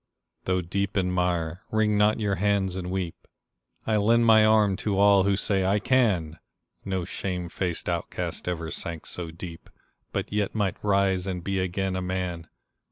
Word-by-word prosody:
Though 90 0 +1
deep 100 +4 -2
in 90 -1 +1
mire, 90 -1 -1
wring 110 -1 +2
not 105 +1 +3
your 105 -2 0
hands 100 -2 +1
and 90 -1 -4
weep; 90 -2 -4 0.6
I 110 -1 +2
lend 115 +3 +4
my 110 -1 +7
arm 110 -2 +4
to 105 -2 -1
all 100 -1 +5
who 100 0 +3
say 95 -1 0
"I 95 +2 +2
can!" 100 -9 +1 0.4
No 95 -2 -2
shame 90 -1 -4
faced 90 -2 -3
outcast 85 0 -3
ever 85 -3 -3
sank 85 +1 -4
so 85 -2 -4
deep, 85 0 -9 0.4
But - - -3
yet 105 0 -1
might 100 -4 -1
rise 100 -2 +2
and 90 -2 -3
be 95 0 -1
again 95 +1 -1
a 95 - -2
man 90 -2 -3
95 Hz, 170 wpm, -26 LUFS, 90-100 Hz, 0.6 s, my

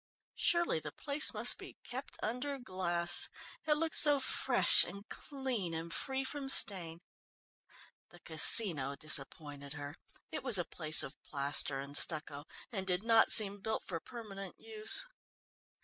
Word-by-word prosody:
Surely 345 - -1
the 150 -1 -9
place 285 - +1
must - - +3
be - - -13
kept 260 +3 -9
under 250 +5 -4
glass. 175 -7 +1 0.4
It 300 - +3
looked 320 +1 -3
so 290 -2 +5
fresh 260 - +4
and 200 +2 -9
clean 255 - -6
and 165 +1 -7
free 265 +7 -4
from 275 0 -8
stain. 175 -9 0 1.1
The 175 - -18
Casino 160 -4 +3
disappointed 145 -1 -3
her 145 -1 -9 0.4
it - - -5
was 250 -6 +3
a 175 - -2
place 155 -2 0
of 135 - -11
plaster 140 0 -2
and 140 +1 -7
stucco, 150 -3 0 0.3
and 190 -4 -5
did 180 +1 -2
not 225 -1 +3
seem 205 -2 +6
built 220 +3 -5
for 170 -3 -6
permanent 195 -3 -10
use. 220 - +2
190 Hz, 145 wpm, -32 LUFS, 155-250 Hz, 1.1 s, seem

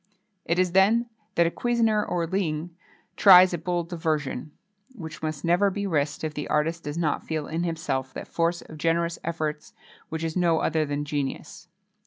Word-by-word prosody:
It 170 - 0
is 185 -1 +2
then 220 +6 +3 0.2
that 170 - +4
a 165 - +1
cusinier 225 -2 +1
hors 170 -1 0
ligne, 170 -3 -1 0.4
tries 185 -2 +8
a 175 - -2
bold 175 0 -2
diversion, 155 -5 -2 0.4
which 160 -8 -8
must 155 -1 -4
never 175 +4 +3
be 200 +1 -3
risked 150 -5 -1
if 155 -1 -2
the 150 -1 -5
artist 160 +2 0
does 145 +2 -4
not 155 -4 0
feel 155 -2 -3
in 165 +3 -3
himself 160 -6 -2
that - - -6
force 170 +1 -1
of 155 - -12
generous 170 +1 0
efforts 155 -2 -4 0.4
which 160 0 -4
is 160 -1 -3
no 170 -3 +3
other 155 -1 0
than 145 0 -2
genius. 145 +3 -4
165 Hz, 180 wpm, -26 LUFS, 155-180 Hz, 0.4 s, tries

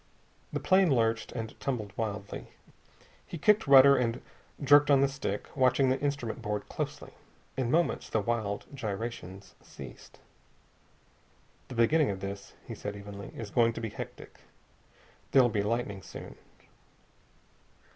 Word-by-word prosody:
The - - -2
plane 190 -1 +4
lurched 115 -4 +1
and 115 -2 -5
tumbled 110 -7 -3
wildly. 105 -2 -4 0.8
He 170 - -6
kicked 210 +4 +3
rudder 140 0 +9
and 120 -2 0 0.4
jerked 145 +1 +6
on 140 -2 +6
the 140 - +5
stick, 135 -7 -4
watching 130 0 +3
the 130 - +1
instrument 140 -6 -2
board 105 0 -3
closely. - - -5 0.4
In 130 -3 -1
moments 165 +5 +1
the 110 - +1
wild 105 -2 -2
gyrations 100 -5 -6
ceased. 65 -3 -12 1.5
"The 125 - -8
beginning 145 +6 +3
of 95 -1 -3
this," 100 0 -7
he - - -7
said 105 0 -6
evenly, 100 0 -9
"is 110 -3 -6
going 115 -1 +3
to 115 - -6
be 115 - -3
hectic. - - -9 0.9
There'll 130 -3 +6
be 105 -2 0
lightning 105 -2 -2
soon." - - -10
115 Hz, 135 wpm, -30 LUFS, 105-135 Hz, 1.5 s, rudder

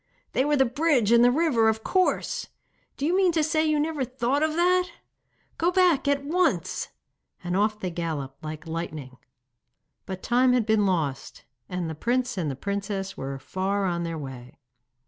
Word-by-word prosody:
'They 260 - +2
were 295 0 +2
the 265 - +5
bridge 260 -3 +2
and 235 0 +6
the 245 - +7
river, 250 -6 +3
of 220 0 -2
course! 370 -1 0 0.5
Do 280 - -2
you 340 +4 +2
mean 375 -2 +4
to 320 -2 +2
say 315 +1 +1
you 305 -1 +2
never 300 -2 -1
thought 255 +2 -1
of 310 0 +1
that? 360 +1 +3 0.7
Go 335 - +3
back 360 -6 +3
at 280 0 +1
once!' 355 +5 0 0.6
and 175 0 -2
off 210 +2 +1
they 185 -4 -3
galloped 155 -5 -4
like 155 +1 -6
lightning. 155 -5 -6 0.9
But 190 -1 -6
time 250 +1 +3
had 245 -3 +2
been 215 -2 +3
lost, 155 -8 -2 0.2
and 180 -2 -3
the 160 - -4
prince 245 +9 -1
and 150 -8 -3
princess 200 0 -3
were 135 0 -5
far 190 +7 -2
on 170 -2 -1
their 165 -1 -3
way. 130 -4 -9
220 Hz, 175 wpm, -26 LUFS, -, 0.9 s, the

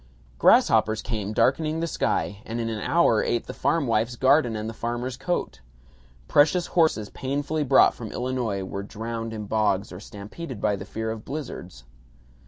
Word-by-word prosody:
Grasshoppers 110 0 +4
came 105 -2 -3
darkening 155 +8 +1
the 165 - 0
sky, 105 -9 -1
and 115 +1 -5
in 115 -1 -2
an 110 -2 -4
hour 140 -10 +3
ate 120 - -1
the - - -7
farmwife's 120 -6 0
garden 130 -2 +3
and 110 0 -4
the 115 - -5
farmer's 120 +3 -3
coat. 175 - -3 0.7
Precious 160 - +4
horses 160 - +2
painfully 145 +3 -2
brought 135 - +5
from 115 -3 -8
Illinois, 120 -6 -2
were 100 +1 -5
drowned 115 +2 -5
in 110 -1 -5
bogs 105 -2 0
or 90 - -8
stampeded 105 +6 -8
by 105 0 +1
the 95 - -7
fear 110 +2 -4
of 110 -1 -6
blizzards. 120 - -7
115 Hz, 165 wpm, -25 LUFS, 105-135 Hz, 0.7 s, brought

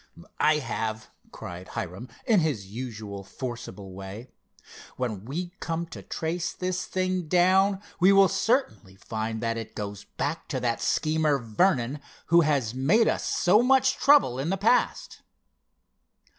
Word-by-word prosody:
"I 155 0 +4
have!" 110 -5 -4 0.2
cried 90 +1 -8
Hiram 110 +2 -6 0.2
in 220 -4 +4
his 145 - -1
usual 105 -2 -7
forcible 100 -4 -7
way. 100 +6 -9 0.7
"When 110 -6 -3
we 170 +8 -4
come 165 0 -3
to - - -8
trace 165 +2 -3
this 185 0 -3
thing 185 -2 -1
down, 190 +4 +3 0.2
we 185 +3 +6
will 195 0 +7
certainly 195 - 0
find 110 +2 -4
that 115 0 -1
it 115 -1 -7
goes 100 -1 -6
back 155 +3 -2
to 135 - -2
that 120 -1 -1
schemer, 155 -2 +1
Vernon, 125 - +1 0.3
who 170 - +8
has 140 -7 +1
made 160 - +3
us - - 0
so 195 +5 +4
much 265 +1 +3
trouble 275 - +4
in 140 +5 -2
the 195 - 0
past." 225 +6 +1
145 Hz, 145 wpm, -26 LUFS, 110-185 Hz, 0.7 s, who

